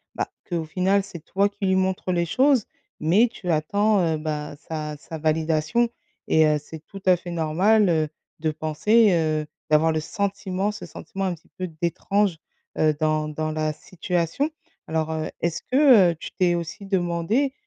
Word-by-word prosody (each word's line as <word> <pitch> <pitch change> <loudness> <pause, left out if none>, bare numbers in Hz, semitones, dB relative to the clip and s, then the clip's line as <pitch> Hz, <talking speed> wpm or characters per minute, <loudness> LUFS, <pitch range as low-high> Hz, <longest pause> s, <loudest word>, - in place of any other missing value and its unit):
«Bah, - - -2 0.2
qu'au 170 -3 -2
final, 190 +4 +1
c'est 180 -4 -10
toi 200 +5 +1
qui 205 0 -5
lui 190 0 +3
montres 190 0 0
les 170 -1 +1
choses, 260 - +3 0.3
mais 190 +10 +4
tu 185 -5 -7
attends, 200 +7 +2
heu, 160 -2 +1
bah, 150 -1 -4
sa 155 -2 -4
sa 160 +2 -8
validation» 160 +8 +1 0.4
et 160 0 +5
heu, 150 -1 +3
c'est 155 +2 -10
tout 195 - -10
à 185 -1 +6
fait 175 0 -8
normal, 180 +6 +3
heu, 155 -2 +1 0.3
de 155 0 0
penser, 160 +9 +3
heu, 155 -2 +1 0.3
d'avoir 155 +2 +4
le 155 - 0
sentiment, 200 +2 -2
ce 210 - -8
sentiment 195 0 -6
un 185 - 0
petit 160 - -25
peu 185 - -3
d'étrange, 195 +2 +1 0.4
heu, 155 -1 +3
dans 155 -1 +1
dans 155 +1 -3
la 155 0 -1
situation. 175 - -2 0.4
Alors, 160 0 -1
heu, 155 0 -3
est-ce 170 -1 -1
que, 255 - +6
heu, - - -5
tu - - -7
t'es 180 -2 +3
aussi 170 +4 -5
demandé, 190 +8 0
170 Hz, 175 wpm, -24 LUFS, 155-200 Hz, 0.4 s, à